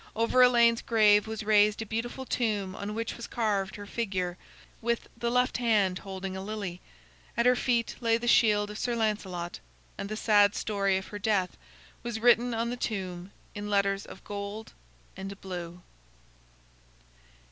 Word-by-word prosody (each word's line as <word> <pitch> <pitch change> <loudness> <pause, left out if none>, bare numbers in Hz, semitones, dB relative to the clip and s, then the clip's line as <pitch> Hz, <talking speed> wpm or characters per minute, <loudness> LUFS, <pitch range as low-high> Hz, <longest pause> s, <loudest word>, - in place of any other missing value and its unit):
Over 230 +3 +3
Elaine's 235 -2 +5
grave 210 -2 +4
was 220 -1 -4
raised 210 0 +4
a 225 - -3
beautiful 235 +4 -4
tomb 210 -7 -1
on 205 +2 -5
which 230 0 -3
was 235 - -7
carved 205 -4 -1
her 205 - -8
figure, 190 -5 -2 0.5
with 235 0 -1
the 235 0 -2
left 250 +1 +2
hand 210 -6 +2
holding 190 -1 -6
a 190 - -5
lily; 200 -3 -5 0.6
at 235 - +2
her 250 0 +6
feet 240 -2 0
lay 230 -1 +3
the 240 +1 -5
shield 210 -3 +4
of 210 - -7
Sir 240 -1 -1
Lancelot, 195 -6 -2 0.4
and 200 - -4
the 215 - -4
sad 205 -2 +4
story 195 -2 0
of 190 - -6
her 205 - -6
death 200 -3 0 0.5
was 235 -2 -4
written 240 +1 +4
on 230 +1 -1
the 245 - -4
tomb 185 -5 -4 0.2
in 205 0 -5
letters 200 -1 +1
of - - -12
gold 205 +2 -6 0.4
and 195 +1 -7
blue. 175 -2 -7
210 Hz, 165 wpm, -29 LUFS, 195-230 Hz, 0.6 s, her